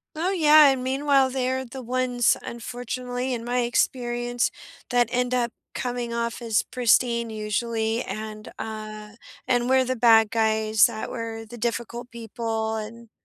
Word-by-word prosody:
Oh, 335 +4 0
yeah, 310 -4 +7
and 265 -2 0
meanwhile, 270 0 +2
they're 260 0 -1
the 260 +2 -8
ones, 250 0 +1
unfortunately, 245 +2 -4
in 235 -2 -4
my 245 +1 0
experience, 240 0 0 0.4
that 245 -2 +3
end 250 0 0
up 240 -2 +1 0.2
coming 245 -2 -3
off 235 0 -2
as 230 -3 +1
pristine 235 -1 +2
usually, 220 +2 -1
and, 215 +1 -7
uh, 215 -1 -7 0.3
and 245 -1 +2
we're 260 0 +4
the 255 0 -2
bad 225 -2 +5
guys 220 -1 +3
that 220 - -3
were 225 -2 -5
the 240 - -9
difficult 235 +1 -3
people, 225 -1 -3
and 225 +1 -7
240 Hz, 145 wpm, -25 LUFS, 225-250 Hz, 0.4 s, yeah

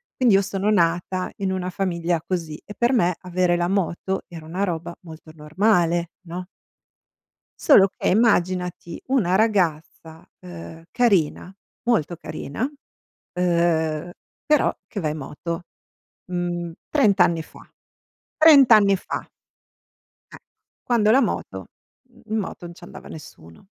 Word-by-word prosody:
Quindi, 250 -5 +3
io 195 - +5
sono 200 +1 -2
nata 180 0 0
in 195 -1 -2
una 185 -1 -2
famiglia 175 -3 -1
così 165 -4 -4
e 205 - -9
per 240 +3 +2
me 180 -9 +2
avere 180 -1 +1
la 175 0 0
moto 190 0 -1
era 165 -3 -10
una 185 +5 -2
roba 170 -2 -3
molto 160 -1 -12
normale, 170 +1 +1 0.2
no? 180 +2 -6 1.1
Solo 195 -10 +6
che, - - 0
immaginati 180 -5 +1
una 215 -9 +2
ragazza, 165 -6 -1
uhm, 85 - -10
carina, 190 -7 +1 0.3
molto 195 - 0
carina, 155 - -6 0.7
uhm, 170 -2 0 0.4
però 300 -1 +3
che 200 - -5
va 155 - -1
in 155 - -5
moto, 165 +4 -6 0.6
mhmm, 175 -1 -3 0.2
30 215 -10 +3
anni 170 -2 +3
fa, - - -16 0.8
30 300 -5 +7
anni 200 -3 +6
fa! - - -6 1.0
Eh, - - -9 0.5
quando 220 -3 +2
la 265 +4 +5
moto - - -3 0.4
mhmm, 240 -1 -22
in 220 - -1
moto 195 -4 -5
non 170 - -10
ci 170 - -17
andava 175 - -11
nessuno. 85 - -13
180 Hz, 135 wpm, -23 LUFS, 165-200 Hz, 1.1 s, 30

